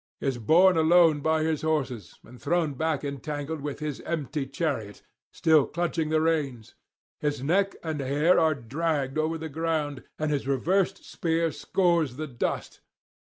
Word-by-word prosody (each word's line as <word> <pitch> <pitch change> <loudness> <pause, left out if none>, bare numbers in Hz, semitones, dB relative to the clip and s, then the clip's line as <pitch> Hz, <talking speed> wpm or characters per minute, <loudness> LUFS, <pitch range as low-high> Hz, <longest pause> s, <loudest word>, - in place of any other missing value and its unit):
is 135 -3 -2
borne 175 - +5
along 160 -2 +5
by 160 +1 +1
his 160 -1 0
horses, 135 - -2
and 120 +1 -15
thrown 160 0 0
back 155 +1 -1
entangled 145 +2 -4
with 145 0 -4
his 150 -2 -5
empty 150 -3 -3
chariot, 135 - -3 0.3
still 155 -3 +3
clutching 170 -1 -1
the 155 0 +2
reins; 145 -8 -1 0.5
his 145 -3 -2
neck 195 +7 +1
and 160 -2 -3
hair 145 +6 +3
are 160 -2 +3
dragged 140 +2 -2
over 160 +1 0
the 160 0 -5
ground, 155 -2 -2
and 155 -1 -1
his 140 -2 -1
reversed 185 +8 0
spear 165 -1 0
scores 170 -2 +1
the 155 +3 -4
dust. 125 -5 -4
155 Hz, 155 wpm, -27 LUFS, 140-165 Hz, 0.5 s, borne